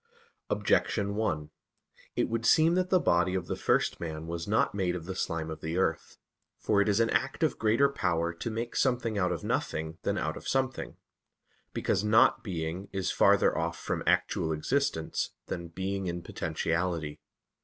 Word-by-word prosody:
Objection 100 -2 +1
1: 80 -8 -1 0.6
It - - +1
would 115 0 -2
seem 160 +7 +5
that 185 0 +1
the 185 - +4
body 90 - +2
of 90 -2 -1
the - - -3
first - - +1
man 80 -1 -5
was 85 0 -4
not 110 +2 +2
made 95 -3 0
of 85 -2 -6
the 95 - -4
slime 85 -3 -2
of 80 - -7
the 80 +2 -3
earth. 80 -4 -1 0.4
For 100 -2 +2
it 100 - +2
is 100 +1 +2
an 115 0 +3
act - - 0
of - - +1
greater 115 +6 +4
power 85 -10 0
to 85 - -5
make 115 +2 -4
something 120 -5 +1
out 90 -1 +1
of 85 - -3
nothing 80 +1 -2
than - - -1
out - - -2
of - - -9
something; 130 -1 -1 0.7
because 95 - 0
"not 105 +1 +4
being" 90 0 -4
is 95 -2 -1
farther - - +4
off 85 +1 -1
from - - -3
actual 80 - +2
existence 80 - -1
than 85 0 -5
"being 95 +3 -3
in 85 0 -3
potentiality." 80 -3 -2
95 Hz, 175 wpm, -29 LUFS, 85-110 Hz, 0.7 s, seem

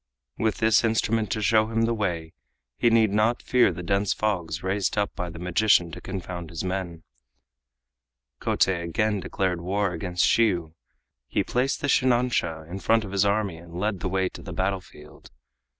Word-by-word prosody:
With 110 -3 +1
this 110 0 +4
instrument 110 -1 +1
to 110 - -1
show 110 +2 +4
him 115 0 0
the 115 +1 +1
way 85 -7 -3 0.5
he 120 - +4
need 115 -2 +4
not 110 +3 +1
fear 125 -1 +4
the 90 - -7
dense 100 +3 +1
fogs 85 -7 -2
raised 95 +2 -1
up 100 0 0
by 90 -2 -4
the 85 - -9
magician 90 0 +2
to - - -8
confound 90 -3 -6
his 85 0 -5
men. 90 -3 -4 1.4
Kotei 90 -3 +1
again 105 +5 0
declared 90 -1 -2
war 95 +2 0
against 90 +1 0
Shiyu. 90 -9 +2 0.5
He - - 0
placed 130 +4 -1
the 145 - -1
shinansha 120 - +1
in 90 +3 -6
front 115 +2 +2
of 95 - -8
his 100 0 +2
army 100 -4 0
and 85 0 -12
led 100 +1 -1
the 95 - -2
way 95 0 +1
to - - -11
the 90 - -8
battlefield. 90 -4 -5
95 Hz, 175 wpm, -25 LUFS, 85-110 Hz, 1.4 s, this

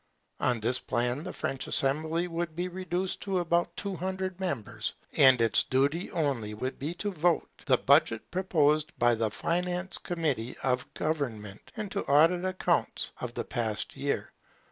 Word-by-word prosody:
On 120 -2 +1
this 120 +4 +1
plan 120 +5 -1
the - - -5
French 135 - -3
assembly 160 +5 +1
would 170 -1 -3
be 175 +2 -1
reduced 185 0 -2
to 195 -2 -1
about 170 0 +1
two 200 -2 -3
hundred 185 +1 -3
members; 120 - -3 0.2
and 130 -4 +7
its 115 -1 +4
duty 140 +7 +1
only 130 -10 -1
would 130 +5 -4
be 155 +5 -3
to 205 +3 -2
vote 175 -1 +1 0.2
the - - +5
budget 115 - +3
proposed 155 -5 +2
by 120 0 +4
the 110 -1 0
finance 180 - -2
committee 150 -9 -2
of 125 -1 0
government, 115 -10 -3
and 215 -2 -4
to 200 - -1
audit 165 +5 +5
the 185 - -1
accounts 185 - 0
of - - -5
the - - -2
past 110 -4 -2
year. - - -2
155 Hz, 165 wpm, -29 LUFS, 125-180 Hz, 0.2 s, and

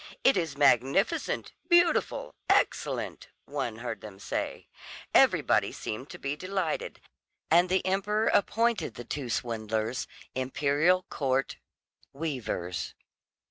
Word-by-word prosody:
"It 270 - +6
is 165 -6 -1
magnificent, 140 - +2 0.2
beautiful, 345 -1 +3 0.2
excellent," - - +1 0.2
one 140 -6 -3
heard - - -4
them 105 -3 -10
say; 100 - -4 0.5
everybody - - +4
seemed 125 +6 -6
to - - -8
be 140 +1 -3
delighted, 185 0 -3 0.5
and 175 +2 +5
the 190 0 +1
emperor 205 +3 +1
appointed 230 - +2
the 120 - -8
two 135 0 -4
swindlers 110 0 -2 0.3
"Imperial 145 +7 +2
Court 135 -1 0 0.6
weavers." 130 - -3
145 Hz, 105 wpm, -29 LUFS, 120-185 Hz, 0.6 s, It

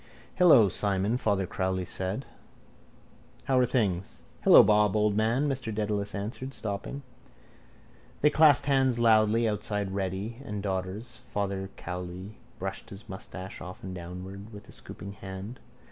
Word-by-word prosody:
—Hello, 155 - +7
Simon, 100 +3 0
Father 100 -6 +1
Cowley 95 0 -2
said. 95 +8 -3 1.2
How 130 -1 +2
are 125 - +4
things? 100 -8 -1 0.2
—Hello, - - +9
Bob, 105 -1 +4
old 105 -1 +2
man, 115 +7 +2
Mr 130 -5 -2
Dedalus 105 -2 -2
answered, 120 +6 -5
stopping. 110 +7 -4 1.2
They 150 - +5
clasped 155 -3 +5
hands 135 -3 +3
loudly 115 0 +4
outside 105 -2 -2
Reddy 100 +5 -3
and 105 -6 -5
Daughter's. 100 +5 -4
Father 100 -1 -2
Cowley 90 +3 -7 0.2
brushed 95 +1 -5
his 100 +1 -11
moustache 95 0 -8
often 90 +1 -8
downward 95 +4 -8
with 105 -1 -11
a - - -13
scooping 100 +3 -9
hand. 95 +4 -8
105 Hz, 130 wpm, -28 LUFS, 95-115 Hz, 1.2 s, Hello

